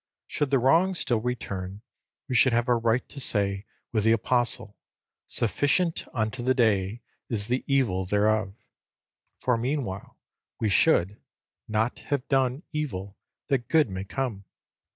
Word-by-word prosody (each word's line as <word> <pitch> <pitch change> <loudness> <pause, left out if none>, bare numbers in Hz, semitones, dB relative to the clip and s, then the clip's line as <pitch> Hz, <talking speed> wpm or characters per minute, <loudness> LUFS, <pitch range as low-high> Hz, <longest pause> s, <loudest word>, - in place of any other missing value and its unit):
Should 145 - -2
the 135 - +4
wrong 165 +9 +3
still 125 -9 +1
return, 100 -5 -4 0.4
we - - -3
should 125 0 +5
have 120 +2 +2
a 125 - +4
right 115 +1 +1
to 140 - -9
say 100 -5 0 0.3
with 110 -3 +1
the 110 +1 +5
Apostle, 115 -2 0 0.5
"Sufficient 145 - +1
unto 110 +1 -2
the 130 +2 +2
day 110 -2 +1 0.3
is 110 -2 -1
the 125 +2 0
evil 115 -10 +1
thereof;" 105 0 +1 0.8
for 125 -2 +1
meanwhile 120 -7 -3 0.4
we 110 - +1
should 95 +1 +3 0.5
"not 110 +3 0
have 140 -2 -1
done 135 +2 +1
evil 105 - -4 0.3
that 130 -5 0
good 155 -9 +3
may 95 0 -4
come." 105 -2 -4
120 Hz, 140 wpm, -27 LUFS, 105-130 Hz, 0.8 s, should